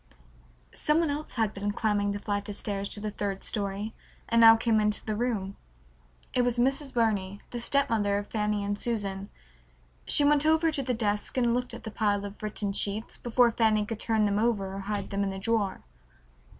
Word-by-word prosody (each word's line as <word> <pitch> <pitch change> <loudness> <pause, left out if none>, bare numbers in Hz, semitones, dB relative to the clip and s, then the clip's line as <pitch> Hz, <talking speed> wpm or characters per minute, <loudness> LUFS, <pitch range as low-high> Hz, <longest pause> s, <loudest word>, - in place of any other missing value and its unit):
Some 300 +1 +2
one 330 -3 +1
else 295 +2 -5
had 220 -3 0
been 200 +1 -3
climbing 205 -1 0
the 200 - -2
flight 205 0 -3
of 205 - -3
stairs 200 -1 -3
to - - -2
the 210 0 -4
third 200 -1 -4
story, 205 +1 -2 0.3
and 230 0 +3
now 225 0 +10
came 225 -1 +2
into 210 -1 0
the 215 - -2
room. 210 -4 -2 0.8
It 250 - +3
was 245 -1 0
Mrs. 270 +3 +1
Burney, 205 -5 0
the 240 - -4
stepmother 225 -6 +1
of 205 - -3
Fanny 210 -1 -1
and 205 0 -2
Susan. 200 -4 -3 0.8
She 290 - +6
went 290 0 +4
over 320 +1 +3
to 295 -3 +1
the 250 -2 -1
desk 210 +1 -1
and 240 -2 +3
looked 250 0 -1
at - - -10
the 220 - -6
pile 205 -2 0
of 200 +2 -9
written 210 -1 -2
sheets 205 +3 -2
before 240 0 +2
Fanny 220 -2 +2
could 220 0 -5
turn 220 -2 +1
them 205 0 +1
over 210 -4 0
or 195 - -5
hide 200 0 -4
them 200 0 0
in 195 - -1
the 195 - -5
drawer. 205 -1 -1
215 Hz, 200 wpm, -28 LUFS, 205-235 Hz, 0.8 s, now